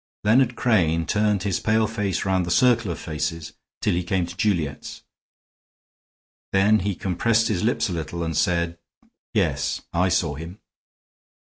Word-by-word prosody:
Leonard 120 +3 +3
Crane 85 -9 +2
turned 105 +2 +1
his 100 -4 0
pale 110 +1 +2
face 105 -5 -2
round 95 -1 +1
the 85 - -4
circle 115 +1 +3
of 85 - -3
faces 80 0 -4 0.3
till - - +1
he 90 - 0
came 90 -1 0
to 85 +1 -9
Juliet's; 85 -8 -2 1.5
then 105 +3 +4
he 100 +1 -2
compressed 110 +6 +1
his 100 -5 0
lips 120 +3 +1
a 95 - -4
little 85 +1 -4
and 80 -1 -3
said: 85 +1 0 0.6
"Yes, - - 0
I 90 +2 +2
saw 85 -4 +1
him." 80 +7 -9
95 Hz, 150 wpm, -23 LUFS, 85-105 Hz, 1.5 s, then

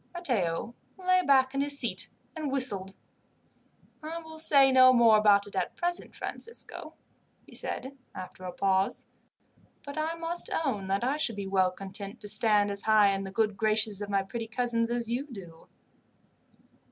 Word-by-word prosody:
Matteo 235 - -1 0.2
lay 370 0 +2
back 265 -3 +3
in 275 - 0
his 285 0 +1
seat - - -1 0.3
and 305 -3 -3
whistled. 200 -8 -1 1.1
"I 315 +2 -6
will 320 -1 -9
say 280 -4 +5
no 255 0 +7
more 235 -3 +6
about 205 -1 +4
it 205 - -12
at - - -2
present, 350 0 -3
Francisco," 465 +1 -6 0.5
he - - -17
said, 265 +2 -5 0.2
after 185 0 -9
a 180 - -5
pause; 190 +1 0 0.8
"but 285 +2 -6
I 320 +2 -1
must 335 +1 -1 0.2
own 205 -8 -2
that 195 +3 -1
I 270 +4 0
should 235 -7 -1
be 200 -1 -5
well 190 -1 +2
content 195 +3 -7
to 210 - -8
stand 210 -1 +3
as 200 0 +1
high 215 -2 +4
in 195 0 -1
the 190 - -7
good 215 0 0
graces 215 -1 +1
of 205 - -5
my 195 -1 +1
pretty 225 +3 -6
cousins 230 0 -1
as 240 -1 -2
you 250 +5 -2
do." 180 - -12
225 Hz, 170 wpm, -28 LUFS, 200-275 Hz, 1.1 s, no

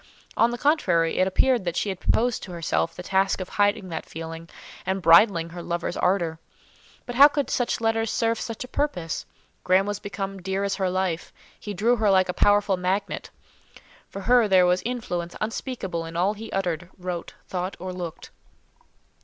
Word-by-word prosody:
On 230 - +4
the 240 - -4
contrary, 185 - +2
it 185 - +4
appeared 240 +4 +2
that 175 -2 -2
she 205 - 0
had 190 -2 -4
proposed 240 +1 +1
to 185 - -8
herself 170 0 -1
the 180 - -7
task 195 +1 +1
of 185 - -5
hiding 205 -2 +1
that 160 -2 -5
feeling, 165 +1 -8 0.3
and 190 +1 -1
bridling 170 -1 +5
her 175 +1 -8
lover's 170 0 -3
ardour. 175 -3 0 0.7
But 245 - -5
how 275 +4 +9
could 285 -1 -2
such 245 - 0
letters 225 0 +1
serve 230 0 0
such 230 0 -5
a - - -9
purpose? 180 - -2 0.4
Graham 185 +2 +3
was 205 0 -3
become 195 -1 -5
dear 190 +2 -2
as 200 0 0
her 190 -2 0
life; 180 -2 -2 0.3
he 205 -1 -6
drew 235 +6 +2
her 215 -2 +2
like 185 -1 +4
a - - 0
powerful 205 -1 +3
magnet. 190 +3 -2 0.8
For 195 - -7
her 240 +2 +4
there 185 -2 +5
was 180 +1 +2
influence 180 -8 -3
unspeakable 215 -6 -3
in 165 +1 -6
all 190 +4 +2
he 220 +1 -9
uttered, 175 -3 -2
wrote, 180 -2 -5
thought, 185 +1 -4
or 185 +1 -5
looked. 175 -3 -7
190 Hz, 185 wpm, -25 LUFS, 175-215 Hz, 0.8 s, how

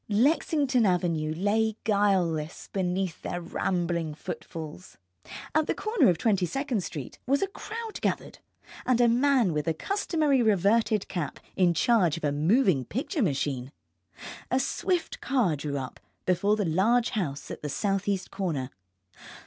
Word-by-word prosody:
Lexington 270 +2 +2
Avenue 170 -5 +1
lay 215 +3 +1
guileless 185 -7 +1
beneath 185 -2 -1
their - - -3
rambling 170 -2 -2
footfalls. 160 +2 -8 0.6
At 310 0 +2
the - - 0
corner 425 - +3
of 175 - +2
Twenty 195 -4 +1
second 270 - -2
Street 145 -8 -7
was 280 +6 +2
a - - +1
crowd 445 +3 -7
gathered, - - -2 0.4
and 255 -2 +2
a 240 - +6
man 245 - +3
with 150 -1 -1
the 165 - 0
customary 310 - +1
reverted 215 0 +2
cap 170 -6 -4 0.2
in 175 -2 +3
charge 185 - +3
of 165 - -9
a 145 - +2
moving 165 - +3
picture 280 - -3
machine. 140 - -1 0.8
A 255 - +2
swift 355 +5 -1
car 240 - +1
drew 140 0 -3
up 130 -1 -6 0.3
before 185 +3 +2
the 210 -2 -1
large 220 +9 +2
house 155 - -3
at - - -7
the 150 - -4
southeast 195 +2 -1
corner. 145 -9 -2
195 Hz, 145 wpm, -27 LUFS, 165-245 Hz, 0.8 s, a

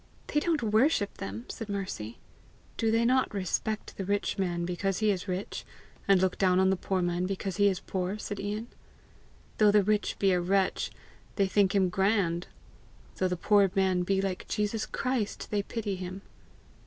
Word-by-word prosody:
"They 295 - +1
don't 315 -4 0
worship 220 0 +2
them!" 105 +5 -5
said 225 -2 -6
Mercy. 185 - -4 0.6
"Do 225 - +1
they 225 +1 +3
not 255 +2 +3
respect 210 +2 -2
the 195 - -2
rich 200 +1 -1
man 175 -2 0
because 180 +2 -1
he 215 -1 +3
is 190 0 -3
rich, 185 +2 -4 0.4
and 195 -2 +6
look 185 0 0
down 185 -1 +4
on 190 0 +4
the - - +3
poor 185 0 -1
man 175 +1 0
because 195 -1 -3
he 205 - +5
is 190 -2 +1
poor?" 185 +2 -3
said 205 -1 -5
Ian. 210 +3 -3 0.9
"Though 210 -1 +6
the 205 0 +5
rich 210 +1 0
be 195 -1 +3
a 180 -1 +2
wretch, 190 +1 +1 0.5
they 200 - +3
think 195 +1 +2
him 190 -2 +3
grand; 190 -2 +1 0.7
though 185 - +2
the 180 -1 -2
poor 200 +2 +4
man 190 -2 +2
be 195 +2 +1
like 190 -2 -3
Jesus 210 +1 -1
Christ, 255 -5 -2
they 205 -1 +1
pity 205 -1 -3
him!" 185 +1 -6
195 Hz, 180 wpm, -29 LUFS, 185-210 Hz, 0.9 s, and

